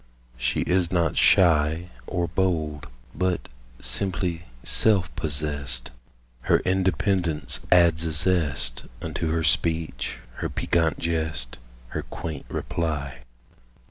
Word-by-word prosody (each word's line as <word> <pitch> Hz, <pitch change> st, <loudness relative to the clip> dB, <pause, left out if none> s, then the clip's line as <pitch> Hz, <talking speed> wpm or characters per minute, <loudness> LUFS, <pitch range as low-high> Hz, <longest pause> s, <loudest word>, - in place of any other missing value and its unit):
She -, -, 0 dB
is 90 Hz, -1 st, +1 dB
not 85 Hz, -4 st, +1 dB
shy 80 Hz, -1 st, +4 dB, 0.2 s
Or 90 Hz, -2 st, -1 dB
bold, 80 Hz, -5 st, -1 dB, 0.3 s
but 90 Hz, -8 st, -1 dB, 0.3 s
simply 90 Hz, +5 st, 0 dB, 0.2 s
self 100 Hz, -5 st, +3 dB
possessed; 70 Hz, -5 st, -1 dB, 0.6 s
Her -, -, +6 dB
independence 95 Hz, -3 st, 0 dB
adds 85 Hz, -2 st, +5 dB
a 80 Hz, -, -1 dB
zest 75 Hz, -7 st, +1 dB
Unto 80 Hz, -, -3 dB
her 80 Hz, 0 st, 0 dB
speech, 80 Hz, -6 st, 0 dB, 0.2 s
her -, -, -2 dB
piquant 80 Hz, -4 st, +1 dB
jest, 80 Hz, -7 st, -2 dB, 0.3 s
Her -, -, -3 dB
quaint 80 Hz, -5 st, -7 dB
reply. 70 Hz, -6 st, -3 dB
80 Hz, 105 wpm, -25 LUFS, 75-90 Hz, 0.6 s, Her